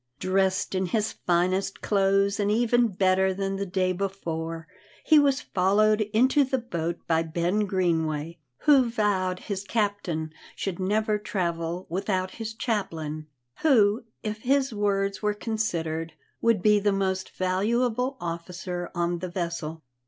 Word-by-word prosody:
Dressed 190 +3 +1
in 185 0 0
his 215 +4 0
finest 185 +2 0
clothes, 195 0 +2
and 205 0 +1
even 240 +2 +3
better 190 -1 +2
than 195 0 -2
the 200 0 -3
day 185 0 +1
before, 165 -4 -4 0.4
he 310 -2 +7
was 280 -2 +3
followed 210 +3 +2
into 260 +6 +4
the 265 0 0
boat 170 -8 -4
by 165 -1 +2
Ben 175 +6 0
Greenway, 165 -3 -1 0.2
who 270 -5 +5
vowed 195 -5 0
his 200 -2 -4
captain 200 -8 -2 0.2
should 195 -3 -4
never 210 +2 +1
travel 170 -3 -2
without 185 +1 -1
his 225 -1 -6
chaplain, 160 - -3 0.3
who, 225 -7 +4 0.2
if 215 -1 -3
his 270 0 +1
words 200 -2 0
were 210 -1 0
considered, 165 -8 -2 0.3
would 230 -5 +2
be 210 -1 +5
the 205 0 +2
most 190 -1 -1
valuable 235 +8 0
officer 175 +1 -5
on 175 0 0
the 185 +1 -4
vessel. 170 -3 -4
195 Hz, 140 wpm, -26 LUFS, 175-215 Hz, 0.4 s, he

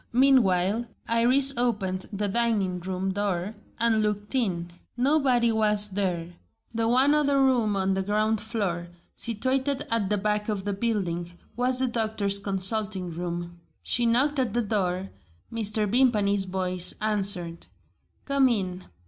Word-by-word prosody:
Meanwhile, 230 -5 +2 0.2
Iris 255 +4 +5
opened 200 -6 -2
the 205 0 -2
dining 200 -4 0
room 185 +1 -3
door 200 -1 -2 0.3
and 230 -1 +2
looked 210 +1 -2
in. 180 -9 -1 0.3
Nobody 255 -3 +2
was 210 -1 +3
there. 180 -3 -2 0.4
The 225 0 -1
one 260 +5 +3
other 285 -2 +2
room 245 -6 +2
on 190 0 0
the 190 - -1
ground 215 +2 0
floor, 200 -6 -3 0.3
situated 260 +5 -1
at 220 -4 0
the 210 - +1
back 210 +1 -2
of 205 -3 -3
the 205 0 -2
building, 190 -6 -3 0.2
was 250 +1 0
the 260 - +1
doctor's 215 -4 +1
consulting 195 -1 -1
room. 175 0 -6 0.2
She 240 -1 +1
knocked 270 +5 +2
at 240 -4 -1
the 240 - +1
door. 190 -3 -1 0.4
Mr. 215 -1 +1
Vimpany's 205 -4 +2
voice 185 -1 +1
answered: 195 -5 +1 0.6
"Come 275 -2 +2
in." 185 -5 -2
210 Hz, 140 wpm, -25 LUFS, 190-235 Hz, 0.6 s, Iris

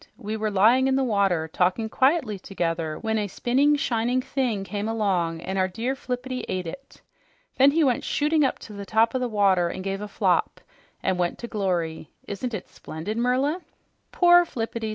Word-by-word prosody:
"We 215 +1 -4
were 215 0 -1
lying 225 +7 +4
in 265 - +2
the 270 - +2
water, 195 -8 +1
talking 185 +7 0
quietly 260 - +1
together 165 -4 -3
when 220 -1 -1
a 205 - -1
spinning, 265 +9 +2
shining 245 -2 0
thing 250 -6 -1
came 205 +2 -4
along 180 -7 0
and 190 +2 -3
our 185 - +2
dear 230 +8 -3
Flippity 255 -1 -4
ate 185 -1 -2
it. 270 +12 -10 0.5
Then 270 +1 +7
he 315 +3 +2
went 255 -4 +1
shooting 300 +1 +1
up 265 - +1
to 215 - -10
the 200 0 -7
top 220 +3 +2
of 260 - -1
the 250 - 0
water 195 -5 +3
and 185 - -6
gave 195 +1 -3
a 210 - -4
flop - - 0 0.4
and 185 -1 0
went 175 -1 0
to 235 - -7
glory! 175 -8 -2 0.2
Isn't 220 +4 -4
it 190 - -7
splendid, 160 +7 -6
Merla?" 260 +8 +1 0.5
"Poor 350 0 +6
Flippity!" 230 -6 -4
220 Hz, 190 wpm, -25 LUFS, 190-255 Hz, 0.5 s, Then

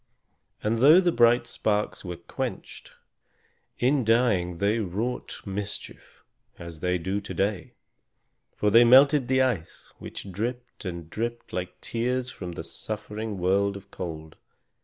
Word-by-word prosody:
And 115 +2 +1
though 150 +8 +8
the 180 -2 +3
bright 120 -2 +4
sparks 105 -2 -1
were 90 -2 -5
quenched, - - -6 0.8
in 130 +2 +2
dying 110 -7 +2
they 100 +5 +1
wrought 110 +5 -3
mischief, 100 0 -7 0.3
as 85 -2 -9
they 90 +2 0
do 95 +4 -2
to - - -7
day; 100 -1 -1 0.8
for 105 - +1
they 115 +3 +8
melted 135 +2 +6
the 130 0 +3
ice, 110 -11 -3
which 100 - -8
dripped 120 +5 -5
and 85 -3 -5
dripped, 115 +6 -5
like 90 0 -4
tears 125 +2 -2
from 90 -2 -7
the 80 - -6
suffering 105 +3 -5
world 100 +2 +1
of 100 0 -15
cold. 80 -3 -7
105 Hz, 140 wpm, -26 LUFS, 90-120 Hz, 0.8 s, though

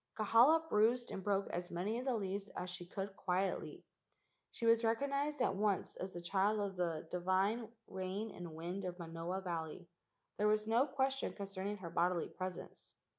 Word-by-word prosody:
Kahala 245 +10 +6
bruised 235 +1 +3
and 190 - -4
broke 200 0 +1
as 175 +1 -3
many 200 +7 -1
of 255 - -5
the 260 -3 +2
leaves 200 -1 -2
as 180 0 -3
she 175 -1 -7
could 195 +1 -4
quietly. 185 +1 -1 0.7
She 230 - -5
was 230 0 +5
recognized 280 +5 +1
at - - +2
once 205 -1 +1
as 185 +1 -5
the 175 - -5
child 200 +4 +2
of 200 -2 -2
the 165 -3 -1
divine 190 +6 +1 0.2
rain 190 +3 -3
and 170 -3 -8
wind 175 +5 -4
of 180 -1 -4
Manoa 170 +2 -4
Valley. 170 -1 -4 0.5
There 210 - +4
was 215 0 +3
no 235 +6 +3
question 270 -1 0
concerning 200 0 -4
her 175 -4 -7
bodily 175 0 +1
presence. 185 -1 -7
195 Hz, 175 wpm, -37 LUFS, 180-225 Hz, 0.7 s, Kahala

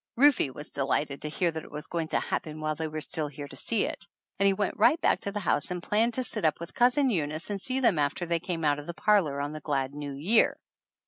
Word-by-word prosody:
Rufe 270 - +5
was 150 - -8
delighted 140 +1 -1
to 150 - -3
hear 170 +2 0
that 160 -1 -6
it - - -12
was 150 0 -6
going 165 -2 -3
to - - 0
happen 155 -1 -3
while 155 0 -1
they 160 +1 -3
were 155 0 -5
still 155 0 0
here 145 0 -8
to 135 - -12
see 220 - 0
it; - - -4 0.4
and 200 - +5
we - - +3
went 200 0 -2
right 305 +9 +5
back - - +2
to 200 - -3
the 210 - -3
house 150 -5 +1
and 180 -1 -4
planned 225 +3 +2
to 255 - +2
sit 240 - -3
up 155 -2 +2
with 170 - -8
Cousin 255 +2 +3
Eunice 155 0 -2
and 200 -1 -3
see 260 +5 -2
them 210 -11 +3
after 145 +4 0
they 170 0 0
came 165 -2 -3
out 145 -1 +2
of 145 - -10
the 170 - -5
parlor 180 -11 +2
on 145 +1 -2
the 155 - -7
glad 140 -2 -1
New 145 -1 -5
Year. 180 +12 +3
160 Hz, 270 wpm, -28 LUFS, 150-205 Hz, 0.4 s, Rufe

